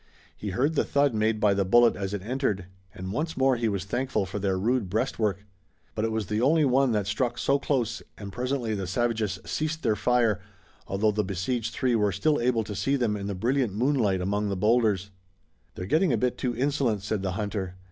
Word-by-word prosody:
He 105 - -5
heard 130 +11 +1
the 150 - +2
thud 140 -2 +2
made 110 0 +1
by 105 -2 +4
the 100 0 +1
bullet 120 +5 +5
as 100 -1 -4
it 100 -2 -4
entered, 115 -5 -1 0.3
and 95 +1 -7
once 155 +6 -2
more 135 -1 +3
he 115 -2 0
was 100 -2 -2
thankful 120 0 -1
for 100 +3 -5
their 95 -1 0
rude 115 +1 0
breastwork. 105 -2 -1 0.5
But 110 - -1
it 115 - -1
was 110 -1 -1
the 105 +4 -1
only 150 +4 +4
one 135 0 +3
that 105 -2 0
struck 120 +4 -1
so 140 +1 +2
close 120 -6 -1 0.2
and 100 -2 -7
presently 125 -1 -1
the 95 -3 -3
savages 115 -2 0
ceased 155 +1 -2
their 110 - +2
fire, 115 -3 +2 0.5
although 105 +3 +1
the 105 +1 0
besieged 105 +5 -2
three 130 -2 +1
were 105 -3 +2
still 145 - +1
able 120 -2 +2
to 105 - -6
see 135 +7 0
them 120 -6 0
in 100 -1 -4
the 100 - -3
brilliant 120 +1 0
moonlight 115 -6 +1
among 100 +2 -1
the 100 - -2
bowlders. 105 -2 +2 0.6
"They're 90 - -5
getting 160 - +2
a 120 - +2
bit 125 +2 0
too 120 -3 -2
insolent," 130 -6 0
said 105 -1 -2
the 95 -1 -2
hunter. 100 -2 -3
110 Hz, 215 wpm, -27 LUFS, 100-125 Hz, 0.6 s, bullet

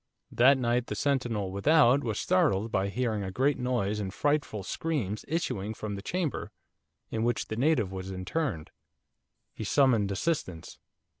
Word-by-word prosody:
That 130 +3 +5
night 120 -1 0
the - - -4
sentinel 120 -9 -1
without 140 +5 +4
was 110 -3 -2
startled 135 - +2
by 95 0 0
hearing 110 -1 -1
a 95 - -3
great 135 +9 +1
noise 115 -5 -1
and 95 -2 -3
frightful 145 -4 -1
screams 110 - -2
issuing 125 - -2
from 105 -1 -5
the 100 - -5
chamber 175 - -2 0.6
in 110 - -2
which 120 -1 -1
the 110 - -3
native 120 -6 +2
was 95 0 -6
interned. 95 - -3 0.8
He - - -6
summoned 115 -4 +3
assistance. 100 - -3
115 Hz, 150 wpm, -29 LUFS, 100-140 Hz, 0.8 s, That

